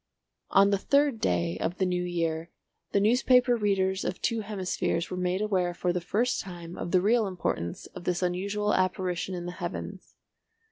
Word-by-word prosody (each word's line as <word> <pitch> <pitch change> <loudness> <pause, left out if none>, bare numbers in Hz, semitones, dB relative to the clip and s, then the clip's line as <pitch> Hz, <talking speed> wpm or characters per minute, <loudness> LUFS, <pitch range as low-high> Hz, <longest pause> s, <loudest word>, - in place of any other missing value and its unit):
On 200 +1 +5
the 200 - +2
third 280 0 +2
day 85 0 0
of 175 - -2
the 190 - +1
new 180 -1 0
year 165 -2 -2 0.4
the 200 - +3
newspaper 245 +3 +4
readers 195 -3 +1
of 180 - -3
two 230 -1 0
hemispheres 190 -4 -2
were - - -2
made 180 +1 -1
aware 185 -4 0
for 175 0 0
the 180 - -1
first 225 +8 0
time 175 -2 -8
of - - -5
the 185 0 +3
real 220 +2 +3
importance 130 - -3
of - - -11
this 180 0 0
unusual 200 +4 0
apparition 185 -1 0
in 175 -1 -5
the 175 - -4
heavens. - - -6
185 Hz, 180 wpm, -28 LUFS, 175-205 Hz, 0.4 s, On